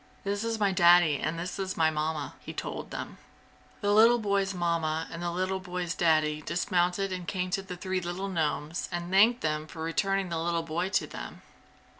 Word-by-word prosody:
"This 200 +1 -2
is 230 -1 -2
my 200 -2 +3
Daddy, 175 -5 +5
and 165 - -2
this 180 +4 -4
is 190 -1 -3
my 160 -1 +4
Mamma!" 155 -1 -2
he - - -8
told - - -5
them. - - -6 0.6
The 205 -1 +2
little 230 +3 +7
boy's 200 -3 0
Mamma 165 -3 -1
and 165 - -6
the 175 - -1
little 185 +2 -1
boy's 180 -2 -3
Daddy 155 -3 +2
dismounted 180 +3 0
and 180 -2 -5
came 185 +1 -2
to 195 - 0
the 185 -2 -8
three 185 0 -2
little 175 +3 -4
gnomes 160 -2 -2
and 175 +1 -4
thanked 220 +6 +5
them 155 0 -1
for 160 0 -7
returning 195 +3 0
the 165 -1 -2
little 170 0 0
boy 170 +3 -2
to - - +1
them. - - -9
175 Hz, 195 wpm, -29 LUFS, 165-195 Hz, 0.6 s, little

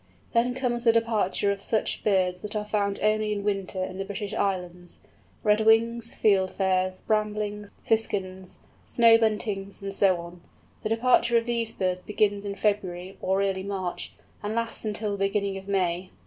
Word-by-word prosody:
Then 245 +2 +2
comes 245 -2 -1
the 230 - +6
departure 220 -3 +1
of 200 0 -4
such 220 +2 -1
birds 185 -3 +1
that 210 +1 -6
are 210 0 -1
found 200 -1 -1
only 215 0 +2
in 205 -1 -2
winter 195 -2 -2
in 185 0 -6
the - - -1
British 205 +1 -5
Islands—Redwings, 210 +5 0
Fieldfares, 190 -2 +1
Bramblings, 210 -1 -1
Siskins, 190 -4 -1 0.3
Snow 230 -1 +6
Buntings, 210 -3 -1
and 195 0 -3
so 195 -2 +3
on. 170 +1 -10 0.4
The 215 - -3
departure 235 +1 +3
of 230 - 0
these 235 -2 -1
birds 185 -1 -1
begins 205 0 0
in 200 0 -3
February, 190 -3 -2
or 190 +1 +1
early 190 -1 -1
March, 190 -2 -4 0.3
and 210 +1 -3
lasts 230 -1 -3
until 210 0 -2
the 195 -1 +1
beginning 200 -1 -1
of 195 - -15
May. 185 -2 0
200 Hz, 160 wpm, -26 LUFS, 190-220 Hz, 0.4 s, the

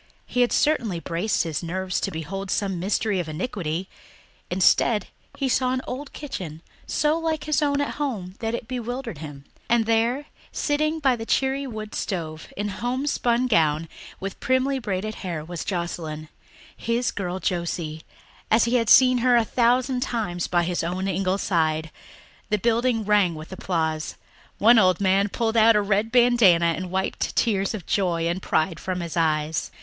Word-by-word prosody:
He 250 - 0
had 245 - +3
certainly 230 - +1
braced 175 +5 -1
his 160 -3 -3
nerves 185 +2 -2
to - - -1
behold 185 +5 -5
some 195 -3 -1
mystery 200 +2 0
of 170 -3 -3
iniquity; 175 -1 -3 0.6
instead 190 +3 +3 0.3
he 275 - 0
saw 255 0 +1
an 260 - -1
old 270 +3 -6
kitchen 175 - -7 0.2
so 305 +2 +1
like 320 -2 -1
his 305 -1 +1
own 285 -1 +1
at 285 - -2
home 205 -11 -3
that 225 0 -1
it 235 - -7
bewildered 245 - -4
him; 145 -3 -9 0.2
and 235 -1 +3
there, 230 +5 +1 0.3
sitting 305 +2 0
by 270 -5 +2
the 225 - -6
cheery 270 +1 +1
wood 215 -3 -7
stove, 160 -5 -4
in 205 +1 -2
homespun 245 +2 0
gown, 160 -8 +2 0.3
with 195 0 -6
primly 260 +2 +1
braided 215 -2 -3
hair, 170 -5 -4
was 175 0 -5
Joscelyn 165 -4 -4 0.5
his 235 +2 -1
girl 185 -2 -3
Josie, 170 -4 -2 0.5
as 220 - +5
he 240 +2 +2
had 230 -2 0
seen 255 -1 +7
her 245 0 +4
a 235 -1 +4
thousand 250 +3 +2
times 205 -9 -2
by 175 -1 +2
his 175 0 -1
own 185 +3 -2
ingle 190 0 0
side. 160 -4 0 0.6
The 210 - +2
building 235 +1 +1
rang 205 -5 +3
with 155 +3 -9
applause; 160 -4 -2 0.4
one 230 +2 +6
old 185 -3 +4
man 195 +1 +2
pulled 225 +1 -1
out 225 0 +6
a 210 - +4
red 205 +2 +1
bandanna 225 -9 +5
and 185 +1 -5
wiped 190 +1 -2
tears 200 -2 +1
of 190 -6 -8
joy 170 -4 0
and 175 +2 -2
pride 160 0 0
from 185 -1 -3
his 170 -1 -5
eyes. 155 -1 0
200 Hz, 170 wpm, -24 LUFS, 175-245 Hz, 0.6 s, seen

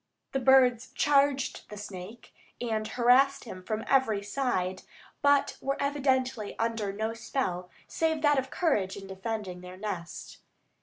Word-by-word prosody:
The 270 - 0
birds 255 -2 +5
charged 280 -2 +2
the 210 - -8
snake 205 +2 -9 0.3
and 220 -2 -2
harassed 255 +4 +4
him 185 -6 -8
from 215 +4 -3
every 225 -7 +2
side, 195 -6 -1 0.4
but 285 -1 +3
were 275 0 -1
evidently 260 -5 0
under 225 -3 -1
no 220 +3 -2
spell 220 -6 -3 0.2
save 320 -1 0
that 290 -2 +5
of 265 0 -4
courage 210 - 0
in 195 - -8
defending 190 -1 -5
their 180 0 -10
nest. 185 -4 -6
230 Hz, 140 wpm, -29 LUFS, 200-270 Hz, 0.4 s, birds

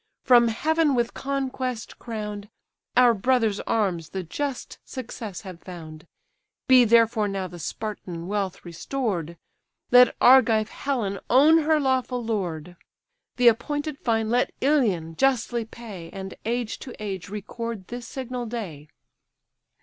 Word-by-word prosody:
from 240 -2 +6
Heaven 305 +5 +1
with 240 -1 0
conquest 260 -3 -3
crown'd, 210 -3 -6 0.5
Our 250 -1 +7
brother's 225 -1 +1
arms 180 -7 -1
the 190 -1 -4
just 275 - -5
success 225 -6 -7
have 185 -3 -10
found: 160 -3 -10 0.6
Be 255 -2 +7
therefore 230 -1 +4
now 195 -1 -3
the 175 -1 -11
Spartan 180 -2 -5
wealth 195 -1 -3
restor'd, 170 - -3 0.5
Let 250 0 +7
Argive 225 -4 +5
Helen 230 -8 -2
own 300 +6 +6
her 310 0 +2
lawful 255 -3 0
lord; 180 -6 -3 0.6
The 245 -1 +4
appointed 290 +6 -2
fine 225 -2 0
let 245 +1 +2
Ilion 210 - +1
justly 240 -3 +1
pay, 210 -7 -10
And 190 +1 -7
age 235 0 -2
to 255 - -9
age 195 -3 -5
record 210 0 -6
this 240 -1 -6
signal 250 -2 -5
day." 185 -11 -6
225 Hz, 125 wpm, -25 LUFS, 195-255 Hz, 0.6 s, Our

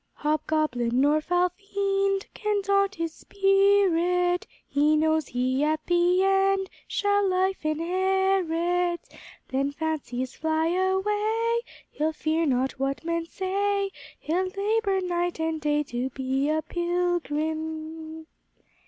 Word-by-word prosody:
"Hobgoblin 300 -5 0
nor 295 +3 +3
foul 355 +2 +2
fiend 395 +1 -1
Can 420 -2 -1
daunt 395 0 +2
his 330 -1 -3
spirit; 375 -3 +2 0.2
He 295 +2 +3
knows 315 -1 +2
he 255 +3 0
at 310 +1 0
the 355 +1 +3
end 390 0 +2 0.2
Shall 405 -1 +1
life 375 0 0
inherit. 355 +1 +1 0.5
Then, 275 +2 0
fancies 285 -5 -3
fly 320 +1 0
away, 420 +5 +1 0.3
He'll 310 +1 -1
fear 320 +1 0
not 260 0 0
what 275 +3 -2
men 335 0 -1
say; 395 +2 -1 0.3
He'll 360 +4 -1
labor 395 0 0
night 350 -1 -1
and 320 -1 -1
day 295 0 +1
To 250 -1 -3
be 265 +2 -1
a 310 0 0
pilgrim." 320 -2 -2
345 Hz, 115 wpm, -26 LUFS, 310-385 Hz, 0.5 s, nor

